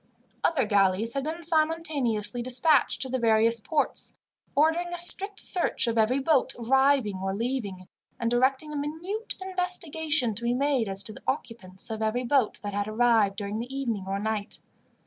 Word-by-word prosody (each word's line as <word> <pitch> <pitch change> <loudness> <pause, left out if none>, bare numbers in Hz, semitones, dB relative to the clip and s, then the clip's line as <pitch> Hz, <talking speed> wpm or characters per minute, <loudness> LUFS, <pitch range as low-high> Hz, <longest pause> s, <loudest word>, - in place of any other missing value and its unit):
Other 290 -8 +2
galleys 205 +1 +2
had 275 0 -3
been 330 +2 -5
simultaneously 310 -9 0
dispatched 255 +5 +3
to 260 - -5
the 260 0 -1
various 230 0 +4
ports, 290 +6 -2 0.4
ordering 320 +4 +2
a 350 0 -5
strict 390 +3 +2
search 355 -7 0
of 230 -1 -1
every 225 +3 +2
boat 275 0 +1
arriving 265 -3 +2
or 190 0 -2
leaving, 210 -6 -4 0.3
and 235 0 -1
directing 265 +5 +1
a - - -5
minute 325 +10 -4
investigation 330 - 0
to 225 - -7
be 240 +1 0
made 265 -5 0
as 195 +1 +4
to 215 - -7
the - - -13
occupants 210 -4 -4
of 220 0 -4
every 220 +3 -1
boat 255 -3 +1
that 205 -1 -4
had 205 0 -2
arrived 220 -3 +2
during 205 +1 -4
the 245 +3 -6
evening 235 -8 -3
or 195 +1 -2
night. 210 0 -4
245 Hz, 170 wpm, -26 LUFS, 215-300 Hz, 0.4 s, various